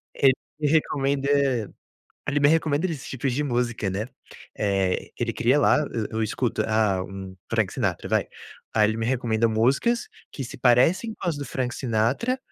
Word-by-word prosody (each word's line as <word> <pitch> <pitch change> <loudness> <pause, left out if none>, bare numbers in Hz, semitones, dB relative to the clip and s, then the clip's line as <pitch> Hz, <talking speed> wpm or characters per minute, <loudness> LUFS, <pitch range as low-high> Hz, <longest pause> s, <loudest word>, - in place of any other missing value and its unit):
ele 135 -1 +5 0.3
me 150 - +1
recomenda 140 -2 +1 1.0
ele 145 +1 +1
me 145 - +6
recomenda 160 +1 +2
desses 155 -6 -5
tipos 130 0 -2
de 140 - 0
música 120 -6 -1
né, 100 +5 -3 0.5
eh, 95 -3 0
ele 120 -1 -1
cria 125 +6 +3
lá, - - +5
eu 110 -2 -2
eu 110 0 -1
escuto. 110 +1 -1
Ah, 105 -4 +2
um 95 -1 -8
Frank - - +1
Sinatra, - - -1
vai. - - +1 0.5
Aí 105 -1 +4
ele 110 - -2
me 115 - -1
recomenda 115 -2 +1
músicas 135 - +1 0.2
que 135 - -5
se 120 - -8
parecem 160 - +3
com 185 - -5
as 160 -4 0
do 140 - -5
Frank 125 -1 -2
Sinatra 125 - 0
125 Hz, 175 wpm, -25 LUFS, 110-145 Hz, 1.0 s, me